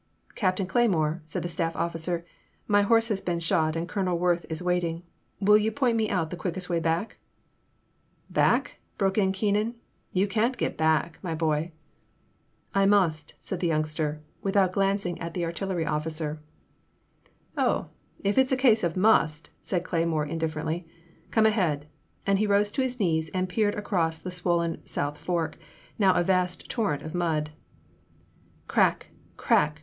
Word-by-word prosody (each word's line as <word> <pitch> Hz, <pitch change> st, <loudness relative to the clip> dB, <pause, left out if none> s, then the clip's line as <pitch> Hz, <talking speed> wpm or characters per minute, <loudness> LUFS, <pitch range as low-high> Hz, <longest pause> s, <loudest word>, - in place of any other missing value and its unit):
''Captain 185 Hz, -1 st, +1 dB
Cleymore,'* 175 Hz, -7 st, +1 dB
said 160 Hz, -, -4 dB
the -, -, -2 dB
staff 165 Hz, -1 st, -2 dB
officer, 170 Hz, +1 st, -2 dB, 0.2 s
" -, -, -40 dB
my 205 Hz, -, +6 dB
horse 225 Hz, +3 st, +3 dB
has 205 Hz, -3 st, 0 dB
been 175 Hz, -1 st, -1 dB
shot 160 Hz, -1 st, +1 dB
and 165 Hz, +1 st, -2 dB
Colonel 185 Hz, -3 st, -1 dB
Worth 175 Hz, 0 st, +1 dB
is 160 Hz, -, -3 dB
waiting. 180 Hz, -1 st, 0 dB, 0.4 s
Will 210 Hz, +1 st, +6 dB
you 215 Hz, +1 st, 0 dB
point 245 Hz, +1 st, +1 dB, 0.2 s
out 180 Hz, -4 st, +1 dB
to -, -, -3 dB
me -, -, -11 dB
the 180 Hz, -, -5 dB
quickest 185 Hz, 0 st, -3 dB
way 170 Hz, -1 st, +1 dB
back? 165 Hz, +6 st, -1 dB, 0.6 s
*' -, -, -41 dB
"Back -, -, +2 dB
!" -, -, -42 dB
broke 195 Hz, +1 st, +1 dB
in 190 Hz, -2 st, +3 dB
Keenan, 210 Hz, +4 st, 0 dB, 0.4 s
"you 195 Hz, +2 st, +2 dB
can't 225 Hz, +5 st, +1 dB
get -, -, -1 dB
back, 160 Hz, +1 st, +1 dB
my 165 Hz, -4 st, -3 dB
boy! 160 Hz, +1 st, 0 dB, 0.5 s
" -, -, -41 dB
"I 195 Hz, -, +4 dB
must," 165 Hz, -7 st, +2 dB
said 190 Hz, -, -5 dB
the 175 Hz, -, 0 dB
youngster, 155 Hz, -1 st, -1 dB, 0.2 s
without 195 Hz, -2 st, +2 dB
glan 195 Hz, 0 st, +2 dB
cing 175 Hz, -4 st, -4 dB
at 170 Hz, 0 st, -5 dB
the 175 Hz, -2 st, -1 dB
artillery 170 Hz, 0 st, -2 dB
officer. 155 Hz, 0 st, -2 dB, 0.6 s
" -, -, -36 dB, 0.2 s
Oh, -, -, +1 dB, 0.3 s
if 205 Hz, +5 st, +2 dB
it 265 Hz, -1 st, +4 dB
's -, -, -2 dB
a 260 Hz, -, +3 dB
case 240 Hz, -5 st, +4 dB
of 170 Hz, 0 st, 0 dB
must," 165 Hz, -6 st, +3 dB
said 180 Hz, -3 st, -1 dB
Cleymore 165 Hz, -4 st, 0 dB
in 165 Hz, +2 st, -4 dB
differently, 160 Hz, +1 st, -2 dB, 0.4 s
"come 220 Hz, -1 st, +3 dB
ahead," 175 Hz, -10 st, +1 dB, 0.4 s
and 195 Hz, -1 st, +2 dB
he 215 Hz, -, +2 dB
rose 205 Hz, +1 st, +3 dB
to 265 Hz, -, -1 dB
his 255 Hz, -1 st, -2 dB
knees 160 Hz, -5 st, +1 dB
and 185 Hz, 0 st, 0 dB
peered 205 Hz, +2 st, +1 dB
across 170 Hz, -6 st, 0 dB
the 185 Hz, -, -6 dB
swollen 170 Hz, -2 st, 0 dB
South 145 Hz, +1 st, -3 dB
Fork, 165 Hz, -3 st, -2 dB, 0.4 s
now 190 Hz, -3 st, +5 dB
a 175 Hz, -, +3 dB
vast 180 Hz, 0 st, 0 dB
torrent 205 Hz, -, -1 dB
of 155 Hz, -, -7 dB
mud. 160 Hz, -4 st, 0 dB, 1.2 s
Crack! -, -, +2 dB, 0.3 s
Crack 150 Hz, 0 st, +2 dB
175 Hz, 175 wpm, -27 LUFS, 160-200 Hz, 1.2 s, my